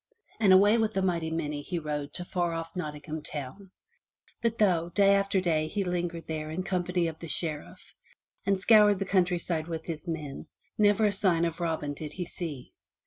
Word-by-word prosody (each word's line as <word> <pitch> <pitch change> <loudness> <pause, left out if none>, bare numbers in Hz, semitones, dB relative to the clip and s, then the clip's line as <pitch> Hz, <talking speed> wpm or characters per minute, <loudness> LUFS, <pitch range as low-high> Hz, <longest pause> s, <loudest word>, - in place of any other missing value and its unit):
and 205 -4 +5
away 205 +4 +6
with 220 -2 0
a - - +3
mighty 170 -3 0
many 150 -3 -3
he 175 +4 -4
rode 150 -3 -3
to 175 - -6
far 175 -2 -1
off 165 +1 -5
Nottingham 155 -2 -5
town. 150 +7 -7 0.7
But 230 -1 0
though, 175 -6 +2
day 200 +2 +4
after 195 -1 +2
day 160 -4 +1
he 200 +5 -2
lingered 175 -2 -3
there 155 -1 -4
in 170 +4 -3
company 180 -2 0
of 160 -1 -4
the 165 - -7
Sheriff, 155 -2 -4 0.5
and 195 -1 +1
scoured 210 0 +6
the 195 - -2
countryside 175 -4 +1
with 165 -1 -5
his 160 0 -6
men, 155 -4 -5 0.3
never 210 0 +4
a 205 - +3
sign 185 -4 +2
of 165 0 -3
Robin 160 -4 -2
did 150 +1 -7
he 180 - -4
see. 155 -7 -7
175 Hz, 190 wpm, -28 LUFS, 160-195 Hz, 0.7 s, away